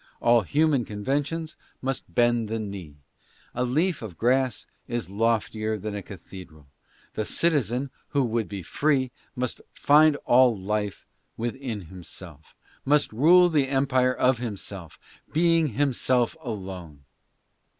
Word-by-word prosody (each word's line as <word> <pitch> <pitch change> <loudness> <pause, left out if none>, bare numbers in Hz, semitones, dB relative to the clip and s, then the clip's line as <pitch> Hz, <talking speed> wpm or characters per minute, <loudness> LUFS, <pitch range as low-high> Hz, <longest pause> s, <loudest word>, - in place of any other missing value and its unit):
All 120 0 +4
human 145 - +2
conventions 145 +10 -2 0.2
must 135 0 -4
bend 120 -2 +3
the 110 +1 -2
knee. 100 -8 -7 0.6
A 125 - -1
leaf 155 +7 0
of 105 -7 -8
grass 130 +1 +1 0.2
is 120 -7 -4
loftier 110 0 0
than 105 +1 -5
a 100 - -4
cathedral. 90 -5 -12 0.5
The 110 - -2
citizen 135 - +1 0.2
who 140 -2 +1
would 115 -2 -1
be 100 -3 -6
free 135 - +1 0.2
must 125 -2 -3
find 150 +1 +5
all 125 -2 +5
life 105 +1 -3 0.3
within 120 -1 -4
himself, 85 -3 -11 0.2
" - - -28
must 145 -3 +2
rule 175 +9 +6
the 150 -5 +2
empire 130 -2 +2
of 125 -2 +2
himself, 100 -7 -6 0.4
being 165 0 +3
himself 130 -2 +1
alone." 95 - -7
120 Hz, 130 wpm, -26 LUFS, 105-135 Hz, 0.6 s, rule